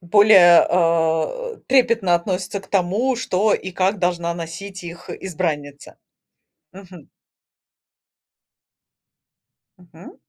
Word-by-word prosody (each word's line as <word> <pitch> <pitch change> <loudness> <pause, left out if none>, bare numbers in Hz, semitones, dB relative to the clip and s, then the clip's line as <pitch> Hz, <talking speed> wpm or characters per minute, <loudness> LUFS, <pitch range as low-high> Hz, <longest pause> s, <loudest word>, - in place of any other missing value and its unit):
Более, 180 -2 +5
а, 165 -2 +1 0.3
э, - - -23
трепетно 230 -8 +2
относятся 185 +3 -3
к 190 - -19
тому, 205 +8 0
что 210 -3 0
и 190 - -5
как 190 +3 -1
должна 175 -1 -2
носить 175 +3 -8
их 170 +1 -11
избранница. 150 -6 -5 0.8
Мгм. 185 -5 -14 2.7
Мгм. 175 -1 -16
180 Hz, 95 wpm, -20 LUFS, 170-200 Hz, 2.7 s, Более